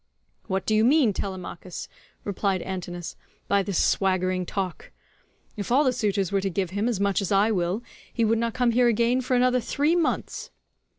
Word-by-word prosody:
"What 190 0 -1
do 215 - +1
you 215 0 +4
mean, 255 -3 +4
Telemachus," 185 -2 -6 0.4
replied 195 -2 -1
Antinous, 175 -2 -5 0.3
"by 200 0 +3
this 195 -2 -2
swaggering 185 -1 +1
talk? 190 -3 -4 0.7
If 205 +1 -5
all 275 +4 +5
the 260 -3 +2
suitors 205 -6 0
were 195 -1 +1
to 195 - -1
give 185 0 -2
him 205 +4 0
as 225 -5 -1
much 200 0 +1
as 195 - -3
I 205 +3 +4
will, 185 +3 -1 0.3
he 230 - +1
would 225 +1 +2
not 230 -1 -1
come 245 -1 +2
here 245 +1 +4
again 235 +2 +2
for 255 0 0
another 250 0 +3
three 290 +7 +1
months." 335 -3 -1
200 Hz, 185 wpm, -25 LUFS, 190-240 Hz, 0.7 s, all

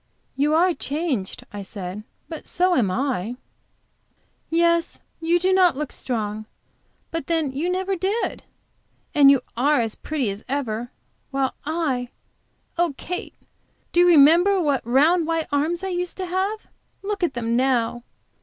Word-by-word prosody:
"You 295 +3 +2
are 355 +2 +4
changed," 280 - -3
I 205 - -5
said, 195 0 -6 0.2
"but 320 -2 -8
so 365 +1 +2
am 225 - +2
I." 240 0 -1 1.1
"Yes, 335 0 +2 0.2
you 330 +1 +2
do 375 +2 +2
not 360 -6 +4
look 300 -2 -3
strong. 215 -3 -3 0.6
But 330 -4 -3
then 320 -5 0
you 300 +7 -2
never 380 +1 -1
did. 390 +6 -2 0.7
And 280 -2 +7
you 275 -2 +5
are 285 +5 +3
as 225 -2 0
pretty 280 -9 -2
as 200 +2 -8
ever, 245 -4 -2 0.4
while 270 -1 0
I 285 -7 -1 0.7
oh, 345 -5 +1
Kate! 360 +2 -5 0.6
do 345 - +2
you 355 - +6
remember 345 +5 +6
what 290 -6 +1
round, 310 +7 +4
white 330 -1 0
arms 315 +5 0
I 385 - -2
used 360 -1 -3
to 375 - -3
have? 380 +4 -1 0.4
Look 405 0 -3
at 340 -7 0
them 235 -1 -1
now!" 240 -2 +1
300 Hz, 150 wpm, -23 LUFS, 245-350 Hz, 1.1 s, And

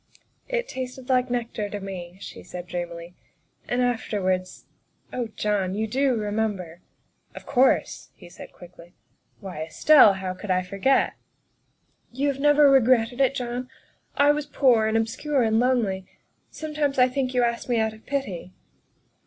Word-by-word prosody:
' - - -40
' - - -44
" - - -46
It - - -1
tasted 260 - -7
like 255 -1 +2
nectar 230 -4 -3
to 205 - -5
me," 185 -2 -8
she - - -9
said 180 -1 -8
dreamily, 175 -1 -6 0.3
" - - -39
and 245 +1 +1
afterwards 190 -6 -2 0.5
oh, 245 -2 -2
John, 200 -3 -1
you 220 +1 -1
do 260 +3 +1
remember?" 205 -5 -3 0.3
" - - -40
Of - - -10
course," 265 -1 +1
he - - -14
said - - -12
quickly. 175 0 -15 0.2
" - - -43
Why, 185 -6 -7
Estelle, 210 - +6
how 190 -1 -4
could 185 +2 -10
I 185 0 +2
forget?" 200 +9 +1 0.4
' - - -46
' - - -43
You 275 +4 0
have 275 -1 -3
never 295 0 +5
regretted 255 -2 +3
it, 270 0 +3
John? 250 0 -4 0.5
I 285 0 +5
was 295 0 -2
poor 245 -7 +3
and 220 +1 +1
obscure 250 +5 0
and 220 0 +2
lonely. 225 -7 0 0.4
Sometimes 300 -3 -3
I 250 -1 +6
think 255 0 -2
you 250 - +3
asked 235 +1 -2
me 240 - +2
out 220 -1 0
of 220 - -18
pity." 200 -10 -4
230 Hz, 180 wpm, -24 LUFS, 190-260 Hz, 0.5 s, Estelle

